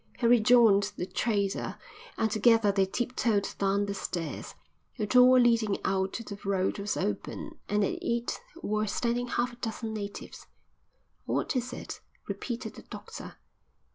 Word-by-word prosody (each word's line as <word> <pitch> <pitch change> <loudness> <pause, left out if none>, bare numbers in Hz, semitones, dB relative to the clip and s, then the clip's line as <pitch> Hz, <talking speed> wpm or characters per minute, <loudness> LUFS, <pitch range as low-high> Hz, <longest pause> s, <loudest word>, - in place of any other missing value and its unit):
He 240 - -1
rejoined 225 -3 +5
the 180 - -2
trader, 200 -1 -1 0.4
and 220 -1 +1
together 220 -1 +4
they 195 -1 +2
tiptoed 230 -2 0
down 200 +1 +2
the 200 - -3
stairs. 175 -4 -5 0.4
The 215 - -1
door 255 +3 +7
leading 230 -4 +3
out 190 0 0
to 230 - -4
the 200 -2 -8
road 195 0 0
was 200 +1 -2
open 105 - -4
and 205 0 +2
at - - -2
it 235 0 -1 0.2
were 215 +1 0
standing 240 +3 -1
half 245 +1 -1
a - - -14
dozen 225 -2 -4
natives. 205 -2 -7 0.8
"What - - -1
is 250 0 -1
it?" - - -7 0.3
repeated 240 -1 -4
the - - -11
doctor. - - -9
215 Hz, 150 wpm, -29 LUFS, 200-240 Hz, 0.8 s, door